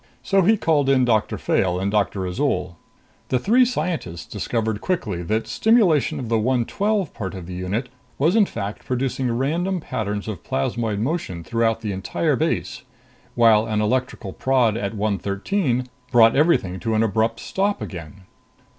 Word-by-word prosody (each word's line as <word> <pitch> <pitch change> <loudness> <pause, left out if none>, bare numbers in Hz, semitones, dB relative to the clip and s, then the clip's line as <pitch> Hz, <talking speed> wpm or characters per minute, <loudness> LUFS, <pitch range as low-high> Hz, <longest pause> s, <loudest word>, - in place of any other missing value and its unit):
So 195 -1 +3
he 215 +5 +4
called 150 -7 +2
in 130 -2 +4
Doctor 110 -3 +1
Fayle 90 -1 0
and 100 +2 -1
Doctor 100 -2 0
Azol." 90 -4 -1 0.5
The 130 - +2
three 230 - +4
scientists 165 - -3
discovered 110 0 -2
quickly 105 - -2
that 110 +6 -1
stimulation 180 - +3
of 125 - -5
the 115 0 +1
112 145 - 0
part 95 -2 -5
of 90 -3 -7
the 90 - -8
unit 95 +8 -3 0.3
was 160 +8 +2
in 215 -3 +5
fact 105 -1 -5
producing 130 0 -1
random 165 +10 0
patterns 105 -8 -4
of 105 -6 -6
plasmoid 105 - -1
motion 110 - -2
throughout 115 +4 0
the 105 -2 -3
entire 95 -2 -1
base, - - -2 0.5
while 115 -2 +5
an 110 -1 0
electrical 110 -3 -1
prod 125 -5 +2
at 105 -1 -3
113 110 - -1 0.3
brought 115 -2 +6
everything 135 - +2
to 110 +5 -1
an 110 - +3
abrupt 110 +2 0
stop 200 +1 -1
again. 85 +1 -8
115 Hz, 155 wpm, -22 LUFS, 100-140 Hz, 0.5 s, brought